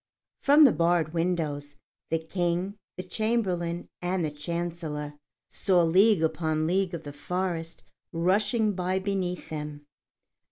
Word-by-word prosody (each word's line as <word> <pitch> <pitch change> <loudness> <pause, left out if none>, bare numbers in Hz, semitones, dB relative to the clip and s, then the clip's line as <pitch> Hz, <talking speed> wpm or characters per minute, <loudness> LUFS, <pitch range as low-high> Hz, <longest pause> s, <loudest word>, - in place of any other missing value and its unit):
From 290 +3 +7
the 270 - +8
barred 170 -2 +1
windows, 155 -4 -1 0.3
the 165 - +2
King, 175 +3 -1 0.2
the 185 - -4
Chamberlain, 185 -5 -1
and 180 -1 0
the 150 - -2
Chancellor 155 -1 -4 0.3
saw 185 -3 +2
league 185 +2 +4
upon 160 -1 0
league 185 +1 +1
of 170 - -7
the 145 - -8
forest 170 +1 -3 0.3
rushing 210 +6 +2
by 185 0 -1
beneath 190 -2 -2
them. 150 -1 -6
175 Hz, 125 wpm, -27 LUFS, 160-190 Hz, 0.3 s, the